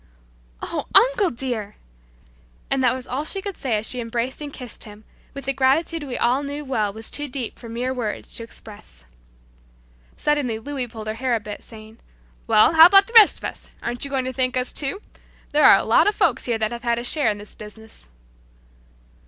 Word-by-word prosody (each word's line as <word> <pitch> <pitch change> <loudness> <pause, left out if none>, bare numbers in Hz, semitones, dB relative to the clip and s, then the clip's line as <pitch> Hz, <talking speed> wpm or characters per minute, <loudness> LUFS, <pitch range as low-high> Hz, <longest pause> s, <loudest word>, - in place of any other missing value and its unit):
"Oh, - - -4
uncle 480 -6 +5
dear!" 235 -5 -5 1.0
and 270 -1 +1
that 250 0 +3
was 255 -1 -7
all 265 +4 -3
she 390 +6 -2
could 395 -1 -6
say 240 -5 -1
as 210 - -3
she 250 - -1
embraced 240 +4 -3
and 290 -1 -6
kissed 250 -4 -9
him 210 0 -13 0.3
with 275 -1 -8
a 275 - +1
gratitude 280 +5 +1
we 255 -3 -5
all 250 +3 +1
knew 290 +1 -6
well 215 -6 -1
was 220 +2 -5
too 295 0 -1
deep 255 -4 -6
for 235 - -10
mere 245 +3 -3
words 230 -5 -5
to 230 - -2
express. 215 - -13 1.1
Suddenly 290 -7 0
Louis 265 +2 -5
pulled 220 -2 -9
her 215 - -3
hair 250 +1 -1
a - - -1
bit, 210 -1 -9
saying, 220 0 -13 0.5
"Well, 215 - +5
how 325 +1 +10
about 390 +1 +6
the 465 - -14
rest 445 -3 +8
of - - -9
us. - - -7
Aren't 240 0 -3
you 280 - -3
going 265 -2 -1
to 260 - -4
thank 255 -1 0
us 250 0 +2
too? 290 +8 -1 0.5
There 300 0 +3
are - - +9
a - - -2
lot - - +4
of 415 - +1
folks - - +1
here 235 -2 0
that 215 0 -1
have 235 0 -6
had 235 -1 0
a 235 - -4
share 280 0 +1
in 210 - -2
this 205 0 -12
business." 215 - -13
250 Hz, 210 wpm, -22 LUFS, 225-285 Hz, 1.1 s, how